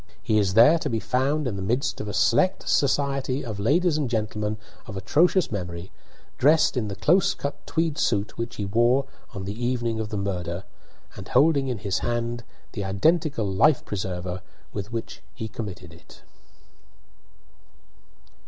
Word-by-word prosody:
He 110 -1 +2
is 95 -2 0
there 135 +9 +7
to 150 - -2
be 115 -3 0
found 135 +5 0
in 105 -5 -3
the - - -4
midst 120 +8 -1
of 105 - -6
a 105 - -4
select 185 0 +2
society 140 -1 +1
of 110 -4 -5
ladies 155 - +2
and 140 -5 -1
gentlemen 105 -1 -2 0.3
of 100 - -6
atrocious 165 - +2
memory, 90 -3 -5 0.5
dressed 155 +3 +4
in 120 -4 -1
the 100 - -5
close 185 - +3
cut 145 0 -6
tweed 160 -2 0
suit 105 -1 0
which 115 +1 -4
he 100 - -3
wore 120 +6 +3 0.3
on 95 -1 -5
the 105 +5 -5
evening 120 -2 0
of 110 -1 -3
the 105 - -3
murder, 90 -2 -3 0.5
and - - -9
holding 140 +1 +3
in 125 -3 -2
his 95 -2 -1
hand 120 0 -2 0.3
the 100 - -4
identical 140 - +1
life 100 +10 +3
preserve, 90 -2 -4 0.3
with 100 +1 -5
which 115 -1 -5
he 110 - -5
committed 95 -6 -7
it. 80 - -17
115 Hz, 160 wpm, -25 LUFS, 100-140 Hz, 0.5 s, there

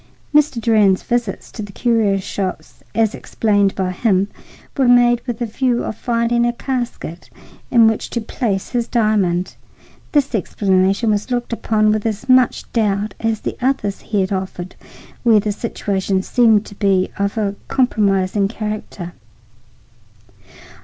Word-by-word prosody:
Mr. 295 -4 +3
Durand's 210 -4 +3
visits 235 -5 -2
to 220 - -7
the 205 -1 -7
curio 220 -3 +1
shops, 190 -1 -5
as 225 -1 +2
explained 205 -3 0
by 185 -1 -1
him, 195 0 +1 0.5
were 270 -3 +2
made 240 -1 +5
with 240 - -3
a - - 0
view 240 +2 0
of - - -4
finding 235 +1 0
a 240 - +2
casket 240 - -5 0.4
in 235 -2 +6
which 220 -1 +1
to 235 - -2
place 215 -3 -2
his 240 -2 -1
diamond. 205 -6 +1 0.6
This 285 -3 +1
explanation 195 +1 +1
was 210 +3 -1
looked 245 -1 -2
upon 215 -2 +2
with 215 +1 0
as 215 -2 -4
much 255 -1 +4
doubt 210 -2 0
as 225 -1 -1
the - - -3
others 240 -6 -1
he 210 -3 -1
had 190 +1 -1
offered 185 -1 -4 0.5
where 225 -3 +5
the 210 +1 -1
situation 195 -3 -2
seemed 225 -3 +3
to - - -11
be 195 -2 +1
of 200 +2 -1
a 205 -2 0
compromising 200 -6 +1
character. 210 -5 -5
215 Hz, 145 wpm, -19 LUFS, 195-235 Hz, 0.6 s, in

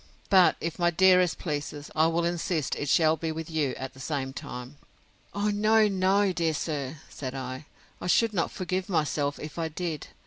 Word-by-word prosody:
But, 185 -2 +6
if 165 +1 -4
my 175 0 +4
dearest 180 0 +4
please, 145 -2 -4
I 160 +1 +4
will 165 +1 +1
insist 170 -3 -1
it 145 - -3
shall 160 0 +4
be 160 0 -2
with 160 +1 -6
you 150 -5 0
at 135 0 -6
the 130 - -15
same 135 -1 -3
time. 125 +2 -8 0.6
O, 205 +1 +1
no, 215 +1 +4
no, 195 0 +2
dear 165 -3 0
sir! 145 -2 -3
said 130 -1 -6
I; 130 +2 -6 0.3
I - - -4
should 225 +4 +3
not 170 -4 0
forgive 185 0 -3
myself, 145 -4 0
if 150 +2 -7
I 165 - 0
did. 160 -1 -4
160 Hz, 185 wpm, -27 LUFS, 145-185 Hz, 0.6 s, But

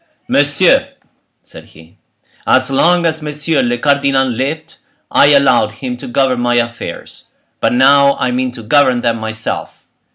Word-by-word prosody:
"Messieurs," - - +1 0.5
said - - -13
he, 80 +2 -19 0.5
"as 130 +1 +2
long 170 +5 +2
as 160 -1 -1
monsieur 150 +1 -2
le 120 0 -1
cardinal 140 0 +1
lived, 140 +7 -4 0.3
I - - +4
allowed 140 -4 +3
him 125 -2 -6
to - - -9
govern 130 0 0
my 120 0 0
affairs; 115 -1 -5 0.3
but - - 0
now 140 +2 +4
I 125 - -1
mean 125 +1 -2
to 120 -2 -10
govern 130 0 +2
them 115 -1 -1
myself. 110 0 -5
130 Hz, 150 wpm, -14 LUFS, 120-140 Hz, 0.5 s, I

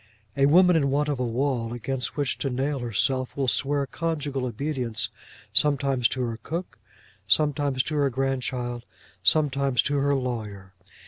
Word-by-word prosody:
A 140 0 +4
woman 180 +3 +6
in 140 -4 +2
want 145 +2 +1
of 140 -3 -1
a - - 0
wall 120 -1 -1
against 125 +3 -3
which 145 -2 -1
to 135 - -1
nail 135 +3 -1
herself 120 +3 -1
will 135 -2 0
swear 140 +3 +1
conjugal 145 -3 -3
obedience 125 -2 -2 0.4
sometimes 140 -4 +3
to 130 -1 -2
her 115 -2 -3
cook, 170 +7 -5 0.5
sometimes 140 +2 +2
to 155 - -4
her 140 -1 +3
grandchild, 125 -2 -2 0.4
sometimes 140 -4 +2
to 145 0 0
her 140 0 +2
lawyer. 105 -7 -4
135 Hz, 150 wpm, -26 LUFS, 125-145 Hz, 0.5 s, woman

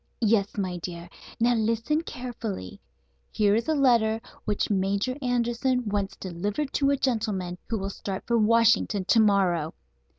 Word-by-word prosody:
"Yes, 210 -3 +2
my 185 -3 -2
dear. 170 0 -7 0.3
Now, 240 +1 +3
listen 230 +7 0
carefully. 230 - -6 0.5
Here 205 -2 +2
is 225 +2 0
a 315 - +2
letter 235 -5 +3 0.3
which 210 0 -1
Major 200 +5 0
Anderson 245 0 0
wants 200 -1 -1
delivered 200 - -3
to 275 -1 +2
a 280 - +2
gentleman 210 -9 -1
who 230 - 0
will 195 0 -3
start 195 -1 -6
for 235 -1 +2
Washington 225 -3 +3
to 225 - +4
morrow. 185 -7 +2
220 Hz, 145 wpm, -26 LUFS, 195-240 Hz, 0.5 s, to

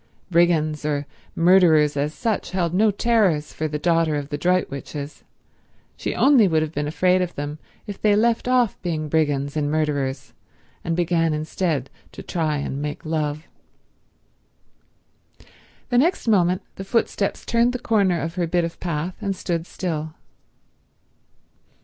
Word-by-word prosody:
Brigands 160 -3 +2
or 145 -1 -1 0.3
murderers 165 -4 +5
as 145 +1 -1
such 220 +6 -2
held 175 -3 0
no 215 +4 +4
terrors 200 -8 +1
for 155 - -2
the 150 0 -3
daughter 165 -1 +1
of 145 -1 -4
the 145 - -3
Droitwiches; 150 -4 -2 0.7
she - - -4
only 265 -7 +5
would 160 -3 +2
have 155 - -4
been 145 -2 -2
afraid 185 +4 +2
of 180 -1 -3
them 145 +1 -5 0.3
if 205 -3 -8
they 210 -1 +4
left 230 +3 +1
off 250 -4 +2
being 155 -4 -3
brigands 145 -2 0
and 145 -1 0
murderers 145 -3 -2 0.5
and 165 - -1
began 165 -2 +1
instead 155 -3 -2 0.2
to - - -9
try 155 -3 -1
and 140 0 -4
make 150 +1 -5
love. 155 0 -2 2.4
The 245 -1 +3
next 335 -1 +1
moment 185 -4 +3
the 195 - -5
footsteps 200 -1 -1
turned 235 +1 +2
the 250 - -3
corner 200 -7 +1
of 165 +1 -4
her 175 -2 -1
bit 175 +1 +1
of 165 0 -5
path, 170 +1 -3
and 200 -2 -2
stood 170 -2 -3
still. 160 -3 -4
165 Hz, 150 wpm, -22 LUFS, 150-190 Hz, 2.4 s, murderers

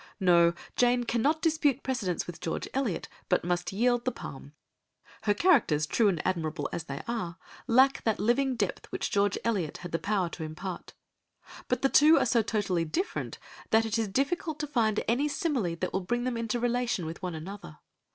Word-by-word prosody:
No, 170 -2 +5 0.2
Jane 245 0 +3
cannot 275 +7 +1
dispute 300 -5 +2
precedence 225 -10 -1
with 175 - -8
George 165 - -3
Eliot, 255 -9 -1 0.2
but - - +2
must 175 0 -1
yield 240 +4 +2
the 255 - 0
palm; 140 - -9 0.7
her 205 - +4
characters, 205 - +3
true 220 +8 +2
and 175 -6 0
admirable 165 -3 -1
as 165 - -4
they 140 -2 -6
are, 185 -8 -3 0.3
lack 265 +3 +4
that 220 -2 +1
living 250 +5 +2
depth - - -2
which - - -3
George 200 0 +2
Eliot 195 -10 -1
had 175 - -6
the 165 - -1
power 200 -3 0
to 165 - -7
impart. 170 +4 -6 0.7
But - - -1
the 270 - +4
two 305 +4 +7
are - - +3
so 235 -2 +3
totally 200 -6 0
different 350 - -3 0.3
that 225 +1 +4
it 225 +1 -1
is 225 - 0
difficult 290 - -1
to - - -1
find 230 -7 +1
any 255 +6 +2
simile 280 - -1
that 180 +2 -3
will 190 - 0
bring 240 +6 -1
them 250 -1 -1
into 230 +1 -2
relation 240 -6 0
with 165 +4 -6
one 180 -3 -4
another. 165 - -8
220 Hz, 190 wpm, -29 LUFS, 175-250 Hz, 0.7 s, two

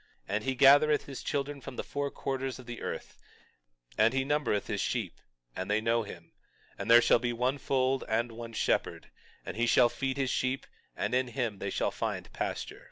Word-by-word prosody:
22:25 100 - -1
And 110 - -1
he 130 0 0
gathereth 145 +3 +6
his 135 -2 -7
children 140 0 -2
from 135 -1 -8
the - - -3
four 145 0 -3
quarters 135 -1 -3
of 130 - -12
the 120 -1 -7
earth; - - -6 0.8
and 115 +4 +4
he 135 - +2
numbereth 145 -7 0
his - - -2
sheep, - - -2 0.4
and 95 - -4
they 105 +1 +3
know 115 +1 +2
him; 85 -6 -10 0.4
and 100 +3 -6
there 120 0 +8
shall - - +5
be 120 0 -1
one 125 +4 0
fold 130 0 +1
and 115 +2 0
one 115 0 -8
shepherd; - - -1 0.3
and - - -6
he 120 +1 +2
shall 120 0 +5
feed 135 +2 -3
his 135 -2 0
sheep, 130 +1 -1 0.3
and 100 +4 -2
in 130 0 +2
him 120 -5 -3
they 100 - -3
shall - - 0
find - - -4
pasture. - - -4
125 Hz, 205 wpm, -30 LUFS, 115-135 Hz, 0.8 s, there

